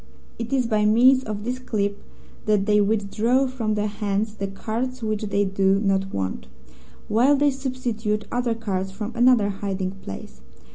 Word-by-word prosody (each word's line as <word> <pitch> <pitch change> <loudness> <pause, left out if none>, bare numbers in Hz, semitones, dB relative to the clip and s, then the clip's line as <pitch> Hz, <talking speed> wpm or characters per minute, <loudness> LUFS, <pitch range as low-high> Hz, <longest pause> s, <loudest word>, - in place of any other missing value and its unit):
It 230 0 -4
is 260 -2 +2
by 215 -2 +1
means 250 +5 +5
of 210 -1 -4
this 250 +3 -3
clip 205 -5 -2 0.5
that 210 -2 +3
they 210 0 +4
withdraw 220 +5 +1
from 235 -5 -2
their 210 0 0
hands 210 0 -2
the 200 -2 -4
cards 235 +5 -4
which 215 -1 -1
they 200 0 +1
do 195 0 +2
not 195 -1 0
want, 95 -10 -3 0.6
while 245 +7 +4
they 290 +1 +3
substitute 245 -5 -2
other 245 -1 0
cards 195 -4 -2
from 210 +4 -6
another 240 -4 +4
hiding 195 -1 -3
place. 95 - -9
215 Hz, 160 wpm, -24 LUFS, 200-240 Hz, 0.6 s, means